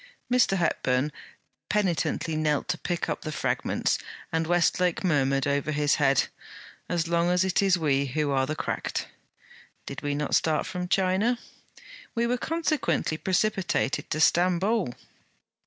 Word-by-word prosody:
Mr. 245 -6 +4
Hepburn 145 -4 +1 0.6
penitentially 175 -5 0
knelt 155 -1 0
to 180 - -1
pick 175 -1 -2
up - - -3
the 155 - -5
fragments, - - 0 0.3
and 160 0 0
Westlake 175 +1 +2
murmured 135 -6 +2
over 140 +1 0
his 145 -1 +2
head: 135 -2 +4 0.7
'As 170 -2 0
long 170 +1 +2
as 180 +1 +3
it 190 +1 +2
is 195 -2 +3
we 140 -4 +1
who 145 +2 -1
are 135 -1 +1
the 155 - -2
cracked.' - - -3 0.8
'Did - - -7
we 145 0 -1
not 150 0 -2
start 155 -2 +2
from 180 0 -4
China?' 190 +6 +2 0.8
'We 235 0 +1
were 245 +1 +1
consequently 315 - 0
precipitated 190 -5 0
to 155 - -2
Stamboul.' 180 - +2
170 Hz, 140 wpm, -27 LUFS, 150-185 Hz, 0.8 s, Mr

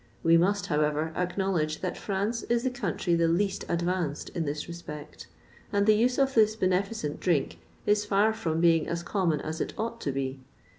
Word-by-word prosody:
We 165 0 +5
must, 195 +4 +2
however, 150 +1 0
acknowledge 180 -4 -1
that 185 -2 -2
France 205 +4 -2
is 235 0 +2
the 260 - 0
country 190 -6 -1
the 170 0 +3
least 190 +4 0
advanced 170 -3 -1
in 165 - -3
this 150 +1 -3
respect, 170 -4 -9 0.4
and 200 -1 +2
the 215 - +6
use 240 +4 +2
of 270 -1 +2
this 220 -2 +4
beneficent 185 -4 -1
drink 170 -6 0 0.3
is 210 0 +3
far 210 +1 +3
from 165 -8 -2
being 165 -2 +4
as 170 0 -3
common 170 -5 0
as 160 +1 -4
it - - -3
ought 230 +1 -3
to 140 - -1
be. 135 0 -3
180 Hz, 185 wpm, -28 LUFS, 160-210 Hz, 0.4 s, the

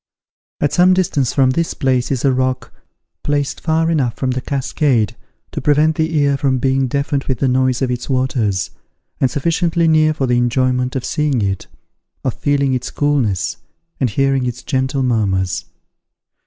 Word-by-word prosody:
At 145 - 0
some 180 +1 +5
distance 150 -9 +1
from 130 -2 +3
this 165 +4 -1
place 130 -2 0
is 135 -1 -1
a 135 - +4
rock, 130 0 -1 0.5
placed 145 -1 -1
far 165 0 +1
enough 135 -8 0
from 130 -1 -1
the 130 0 -2
cascade 130 -4 0 0.4
to - - -4
prevent 150 +2 +3
the 160 +1 0
ear 140 -1 +2
from 135 -2 +1
being 135 +1 +1
deafened 140 +1 -1
with 130 - -1
the 135 - +1
noise 130 0 +1
of 125 - 0
its 125 +2 -4
waters, 125 -7 0 0.5
and 130 - +3
sufficiently 165 +4 +1
near 155 -1 +3
for 140 - 0
the 120 -1 +1
enjoyment 125 +1 0
of 130 - -2
seeing 145 -7 0
it, 95 -1 -2 0.6
of - - 0
feeling 140 -2 0
its 125 -1 -2
coolness, 120 - 0 0.4
and 130 - +1
hearing 135 +2 +1
its 125 0 -5
gentle 130 +1 -1
murmurs. 95 -7 0
130 Hz, 170 wpm, -18 LUFS, 125-145 Hz, 0.6 s, some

